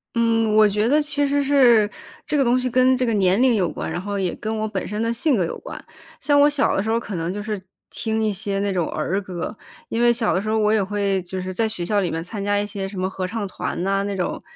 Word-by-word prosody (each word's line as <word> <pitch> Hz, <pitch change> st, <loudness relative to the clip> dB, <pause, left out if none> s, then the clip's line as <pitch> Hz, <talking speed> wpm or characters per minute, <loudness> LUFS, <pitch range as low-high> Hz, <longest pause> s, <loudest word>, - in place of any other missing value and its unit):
嗯， 225 Hz, -1 st, +2 dB
我 215 Hz, -, +7 dB
觉 210 Hz, +2 st, +1 dB
得 295 Hz, +4 st, +4 dB
其 295 Hz, -1 st, 0 dB
实 285 Hz, +1 st, +1 dB
是 255 Hz, -7 st, +5 dB, 0.4 s
这 300 Hz, -, 0 dB
个 280 Hz, -, +3 dB
东 245 Hz, 0 st, +3 dB
西 255 Hz, 0 st, -1 dB
跟 255 Hz, +1 st, +3 dB
这 255 Hz, -1 st, 0 dB
个 230 Hz, -, 0 dB
年 190 Hz, 0 st, +3 dB
龄 255 Hz, -2 st, +4 dB
有 185 Hz, -6 st, +1 dB
关， -, -, -5 dB
然 175 Hz, -, -3 dB
后 200 Hz, +1 st, -4 dB
也 185 Hz, -3 st, -1 dB
跟 220 Hz, +1 st, -4 dB
我 215 Hz, -, -1 dB
本 200 Hz, -4 st, -4 dB
身 210 Hz, +1 st, -4 dB
的 230 Hz, +1 st, 0 dB
性 265 Hz, +2 st, +1 dB
格 185 Hz, -, +1 dB
有 165 Hz, -, -4 dB
关。 -, -, -9 dB, 0.4 s
像 290 Hz, -1 st, +3 dB
我 290 Hz, +1 st, +6 dB
小 290 Hz, -1 st, +1 dB
的 195 Hz, -, +1 dB
时 220 Hz, -, -2 dB
候 225 Hz, -, +2 dB
可 215 Hz, -4 st, -6 dB
能 170 Hz, 0 st, -2 dB
就 205 Hz, -, -5 dB
是 210 Hz, -2 st, -4 dB, 0.3 s
听 220 Hz, -1 st, -2 dB
一 215 Hz, -, +1 dB
些 200 Hz, 0 st, -3 dB
那 200 Hz, 0 st, 0 dB
种 175 Hz, -4 st, 0 dB
儿 170 Hz, +6 st, -1 dB
歌， 185 Hz, +2 st, -5 dB, 0.3 s
因 230 Hz, -, -1 dB
为 240 Hz, 0 st, +5 dB
小 230 Hz, -2 st, +1 dB
的 185 Hz, -, 0 dB
时 215 Hz, -, -5 dB
候 220 Hz, +1 st, +1 dB
我 210 Hz, 0 st, +2 dB
也 220 Hz, -2 st, +3 dB
会 195 Hz, -1 st, -1 dB
就 185 Hz, +1 st, -5 dB
是 185 Hz, 0 st, -5 dB
在 225 Hz, +3 st, +1 dB
学 180 Hz, -5 st, -4 dB
校 205 Hz, +3 st, +1 dB
里 180 Hz, -3 st, -1 dB
面 165 Hz, +1 st, -3 dB
参 200 Hz, +2 st, -6 dB
加 205 Hz, 0 st, +1 dB
一 205 Hz, -, -1 dB
些 200 Hz, -2 st, -5 dB
什 195 Hz, -1 st, -8 dB
么 185 Hz, -, 0 dB
合 190 Hz, -1 st, -5 dB
唱 210 Hz, +2 st, -3 dB
团 185 Hz, -, -4 dB
呐， 195 Hz, +1 st, +1 dB
那 200 Hz, 0 st, -3 dB
种 180 Hz, -, -3 dB
210 Hz, 310 characters per minute, -22 LUFS, 195-235 Hz, 0.4 s, 我